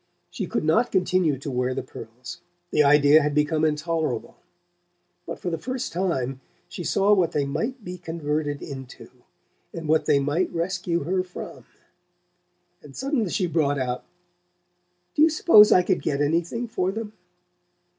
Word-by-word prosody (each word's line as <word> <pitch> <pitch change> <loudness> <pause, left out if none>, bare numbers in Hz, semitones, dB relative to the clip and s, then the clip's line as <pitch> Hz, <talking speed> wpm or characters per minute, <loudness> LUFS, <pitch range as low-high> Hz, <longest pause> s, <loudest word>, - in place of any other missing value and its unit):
She - - -4
could - - -2
not 165 +11 +2
continue 180 -5 +1
to 140 +2 -6
wear 125 0 -1
the - - -3
pearls: 120 +8 -10 0.3
the 150 - +4
idea 145 +1 +6
had 145 -1 -1
become 150 +1 +1
intolerable. 155 -5 -1 0.9
But - - -5
for 180 - -4
the 165 - -3
first 255 +4 -4
time 135 -8 -2 0.3
she 175 - -7
saw 200 +4 +3
what 180 -5 +2
they 145 -2 0
might 225 - -3
be 180 0 -7
converted 150 -3 -3
into, 135 -2 -9 0.6
and 165 -2 -7
what 155 +1 +2
they - - +4
might 145 +6 0
rescue 175 -1 -2
her 185 +4 0
from; 180 -1 -9 1.2
and 145 -2 -14
suddenly 270 - -1
she 185 - 0
brought 155 -4 +1
out: 125 -2 -3 1.1
"Do - - 0
you 320 - +7
suppose 305 -9 +6
I 180 - +6
could 185 0 0
get 140 -2 -1
anything 170 +11 0
for 185 -4 -1
them?" 215 +1 -6
165 Hz, 155 wpm, -24 LUFS, 145-185 Hz, 1.2 s, you